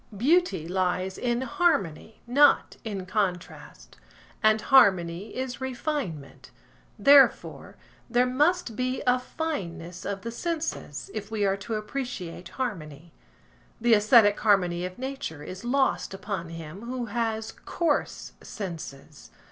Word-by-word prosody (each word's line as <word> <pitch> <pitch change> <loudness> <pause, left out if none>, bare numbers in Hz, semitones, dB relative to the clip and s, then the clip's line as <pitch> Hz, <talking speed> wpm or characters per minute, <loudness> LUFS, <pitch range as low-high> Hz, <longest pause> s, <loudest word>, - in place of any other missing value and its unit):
Beauty 295 - +2
lies 185 +1 -1
in 240 0 -1
harmony, 260 - 0
not 280 +5 +4
in 200 -4 -5
contrast; 185 -2 -4 0.4
and 215 0 +4
harmony 195 -7 +3
is 260 0 -4
refinement; 255 - -4 0.5
therefore, 280 -1 +4 0.3
there 245 +1 +3
must 290 0 +1
be 255 +2 -2
a 250 0 +3
fineness 185 - -5
of 200 -1 -4
the 230 - -5
senses 330 +7 -4
if 210 -1 -5
we 215 -2 0
are 195 0 +2
to 220 +3 -4
appreciate 215 -7 -5
harmony. 165 - -5 0.7
The 235 0 +4
æsthetic 210 -1 +6
harmony 180 -5 +2
of 185 - -12
nature 260 - -5
is 185 +6 -8
lost 265 -5 0
upon 195 -3 -5
him 165 +2 -8
who 250 -1 -3
has 225 0 -2
coarse 330 -4 -2
senses. 160 -7 -8
220 Hz, 120 wpm, -27 LUFS, 180-255 Hz, 0.7 s, æsthetic